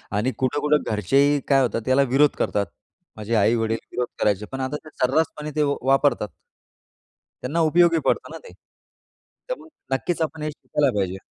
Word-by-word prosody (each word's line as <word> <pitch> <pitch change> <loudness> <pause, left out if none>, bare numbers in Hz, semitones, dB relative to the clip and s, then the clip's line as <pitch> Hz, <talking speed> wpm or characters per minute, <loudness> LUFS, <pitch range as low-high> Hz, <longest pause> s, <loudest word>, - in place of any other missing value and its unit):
आणि 110 +6 +1
कुठं-कुठं 145 +3 +1
घरचेही 135 +8 +3
काय 135 -1 +4
होतात, 120 -2 0
त्याला 130 +1 +3
विरोध 145 +2 +6
करतात. 100 -1 0 0.5
माझे 110 +2 -2
आई-वडील 115 +1 +2
विरोध 125 0 -2
करायचे, 105 0 +1
पण 135 - -5
आता 130 +3 -2
ते - - -10
सर्रासपणे 150 +3 0
ते 150 - +2 0.2
वापरतात. 135 -4 +2 1.2
त्यांना 145 +7 -1
उपयोगी 170 0 +4
पडतं - - 0
ना - - -7
ते. - - -12 1.0
त्यामुळे - - -6 0.3
नक्कीच 165 +7 -2
आपण 160 0 -2
हे 155 - -1
शिकायला 145 -1 0
पाहिजे. 95 -1 -1
135 Hz, 155 wpm, -23 LUFS, 115-150 Hz, 1.2 s, विरोध